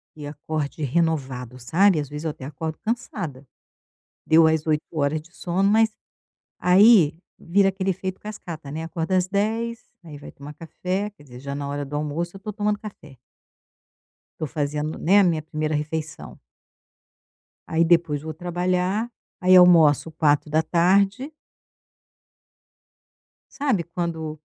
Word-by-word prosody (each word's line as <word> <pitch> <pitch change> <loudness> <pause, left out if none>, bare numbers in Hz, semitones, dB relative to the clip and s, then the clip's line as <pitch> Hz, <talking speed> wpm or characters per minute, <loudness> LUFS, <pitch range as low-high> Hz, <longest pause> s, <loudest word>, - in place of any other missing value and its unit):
que 150 -2 -8
acorde 150 +1 -4
renovado, 130 -5 -1
sabe, 170 +7 +3
às 145 - -3
vezes 150 +2 -7
eu - - 0
até 135 -3 -8
acordo 155 +2 -5
cansada. 180 - -4 0.8
Deu 160 0 +6
as 160 -1 +1
8 155 -1 +1
horas 155 0 0
de 170 +3 -21
sono 190 +3 0
mas 220 +1 +4 0.7
aí 180 -4 +5 0.2
vira 195 +3 +2
aquele 190 0 -1
efeito 185 +1 -4
cascata, 170 -8 -8
né, 160 +2 -5
acorda 165 +2 -2
às 185 0 +2
10:00, 225 +4 -2 0.2
aí 155 -3 -10
vai - - -11
tomar 145 +2 -11
café, 185 +6 -4
quer 200 - -21
dizer, 125 -2 -12
já 140 0 -5
na 140 0 -4
hora 145 0 -3
do 145 +2 -5
almoço 160 +5 -3
eu - - -9
estou 210 +2 -6
tomando 210 0 -1
café. 155 - -11 1.2
Tô 155 - -2
fazendo, 150 +2 -3
né, 195 +5 +4
a 200 - +6
minha 165 -3 +1
primeira 155 0 -3
refeição. 150 +1 -5 1.3
Aí 160 +1 +2
depois 165 -4 +2
vou 160 0 -6
trabalhar, 180 +6 -1 0.3
aí 185 0 +6
almoço 165 -4 +6
16:00. 170 - +2 2.2
Sabe 265 - 0
quando 160 -3 -5
165 Hz, 140 wpm, -23 LUFS, 150-190 Hz, 2.2 s, Deu